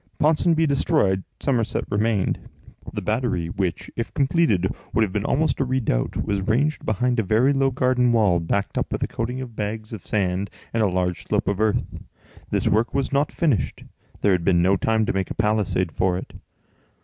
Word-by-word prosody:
Ponsonby 160 +1 +3
destroyed, 140 - +2 0.2
Somerset 120 -5 0
remained. 105 -1 0 0.4
The - - -5
battery, 110 -7 -1
which, 90 -2 -3
if 115 - -3
completed, 135 - +2 0.3
would 110 - +4
have 95 -4 -2
been 105 - -1
almost 155 +4 +1
a - - +3
redoubt, 125 - -1
was 100 -1 -1
ranged 135 +10 0
behind 120 +3 0
a - - +2
very 115 +8 +3
low 135 -1 +2
garden 125 -1 +2
wall, 105 -7 +3
backed 95 +4 -1
up - - -3
with - - -1
a - - 0
coating 125 +3 -3
of 120 -3 -8
bags 110 +1 -4
of 105 - -6
sand 95 -1 -1 0.2
and 115 - +1
a 105 - +4
large 90 -1 -1
slope - - 0
of 100 -1 0
earth. 110 -1 +2 0.7
This - - 0
work 110 +3 +1
was 135 -2 0
not 140 +2 +2
finished; 150 - 0 0.4
there 100 - +3
had 90 -2 +1
been 85 -1 +3
no 95 +2 +4
time 110 +3 +1
to - - -1
make 95 -1 -1
a - - -5
palisade 105 -5 +1
for 90 +1 0
it. 95 - -8
110 Hz, 190 wpm, -23 LUFS, 95-130 Hz, 0.7 s, would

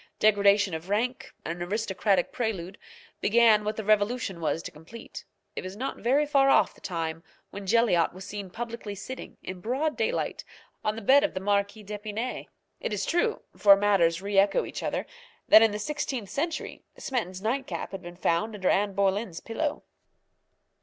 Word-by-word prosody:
Degradation 200 -2 +4
of 160 +3 -6
rank, 235 +5 -1
an 170 +1 -4
aristocratic 195 0 0
prelude, 200 -6 -3 0.4
began 220 -1 +5
what 215 +1 -2
the 220 - -4
revolution 210 -2 +1
was 165 +1 -1
to - - -6
complete. 160 +10 -11 0.3
It - - -4
was 185 +2 -7
not 270 +4 -3
very 275 +5 +2
far 275 -2 +4
off - - +4
the - - -21
time 165 -2 -4 0.3
when 200 -1 -8
Jelyotte 215 -6 +3
was 190 +1 -10
seen 200 -2 -6
publicly 230 -1 -6
sitting, 260 +6 -8
in 185 -1 -7
broad 270 - -1
daylight, - - -1 0.4
on 215 - 0
the 225 - -7
bed 275 +7 +6
of 300 - -1
the - - -1
Marquise 200 +2 0
d'Epinay. 210 +4 -4 0.3
It - - -3
is 205 - -1
true 350 +7 0
(for 200 -1 +7
manners 190 -4 +2
re 200 -1 +2
echo 205 - +3
each - - -6
other) - - -2 0.4
that 220 - +9
in 225 - +6
the 210 - -4
sixteenth 250 -4 -3
century 315 +7 -3 0.2
Smeton's 200 -8 -3
nightcap 255 +5 -2
had 195 -1 -6
been 175 -1 -10
found 210 +5 0
under 190 -3 0
Anne 200 -1 +1
Boleyn's 195 -2 0
pillow. 290 +6 -3
205 Hz, 175 wpm, -27 LUFS, 190-235 Hz, 0.4 s, that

